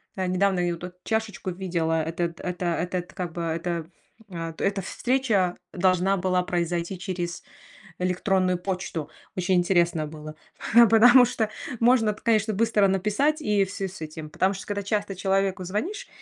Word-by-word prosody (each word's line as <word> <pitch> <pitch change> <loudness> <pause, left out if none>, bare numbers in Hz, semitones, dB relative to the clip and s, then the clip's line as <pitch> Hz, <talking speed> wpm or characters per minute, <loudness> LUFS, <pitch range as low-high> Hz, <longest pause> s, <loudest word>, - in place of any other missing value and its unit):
э, 185 -1 -1
недавно 185 0 +2
я 175 - +1
ю 170 -1 -1
тут 180 +1 -8
чашечку 220 -4 -2
видела, 170 -3 -1
этот 170 +1 -3
это 180 0 -4
этот, 180 +1 -3
как 180 -3 -4
бы, 170 - -4
эта, 170 +1 -2
ф 160 - -8 0.5
а, 165 -1 -5
эта 195 0 0
встреча 220 -5 0 0.2
должна 185 +1 +2
была 180 0 +1
произойти 175 +1 -2
через 180 -1 -4 0.6
электронную 185 0 +1
почту. 180 -4 -4 0.3
Очень 185 +1 +1
интересно 175 -3 +2
было, 155 0 -9 0.6
потому 245 +3 +8
что 220 -3 -1 0.3
можно 235 -2 +4
эт 210 - -3
конечно, 220 -1 +2
быстро 215 -1 +3
написать 210 - +1
и 210 -6 +2
всё 195 0 -4
с 185 -2 -11
этим, 155 0 -7
потому 190 +5 +1
что, 195 - -8
когда 205 -1 -3
часто 205 -1 -2
человеку 190 0 0
звонишь, 330 - -3
185 Hz, 160 wpm, -25 LUFS, 175-205 Hz, 0.6 s, потому